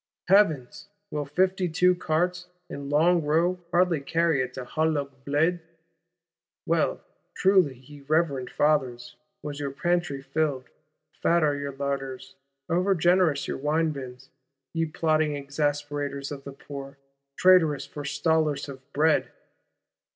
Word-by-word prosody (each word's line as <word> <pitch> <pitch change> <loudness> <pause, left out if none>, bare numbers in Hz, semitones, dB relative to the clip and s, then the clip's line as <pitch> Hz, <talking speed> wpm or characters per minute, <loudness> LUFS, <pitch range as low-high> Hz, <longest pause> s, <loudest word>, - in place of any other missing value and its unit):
—Heavens, 160 -12 +3 0.2
will 150 -1 -2
"fifty 185 +4 +1
two 180 +3 +4
carts," 180 +1 -1 0.2
in 140 -3 -6
long 165 +4 +4
row, 165 +4 +1
hardly 175 -2 +2
carry 165 -1 +1
it 130 0 -3
to - - -5
the - - -8
Halle 155 +3 0
aux 140 -1 -3 0.2
Bleds? 160 +5 +1 1.0
Well, 165 -1 +1 0.3
truly, 185 -9 +3
ye 140 +3 -14
reverend 150 -5 +1
Fathers, 130 -5 0 0.3
was 145 -1 -5
your 145 -1 -2
pantry 165 -1 -1
filled; 145 -3 -1 0.5
fat 170 -1 +3
are 145 -1 +2
your 140 -1 -4
larders; 135 -1 -4 0.3
over 185 +3 +2
generous 175 -4 +2
your - - -3
wine 155 +3 +1
bins, 130 -2 -9 0.4
ye 165 -1 0
plotting 155 -1 +1
exasperators 145 0 -2
of 140 -1 -7
the 140 - -6
Poor; 140 0 -9 0.4
traitorous 175 -6 +4
forestallers 150 0 -1
of 135 -2 -9
bread! 155 +2 +2
150 Hz, 130 wpm, -26 LUFS, 140-170 Hz, 1.0 s, two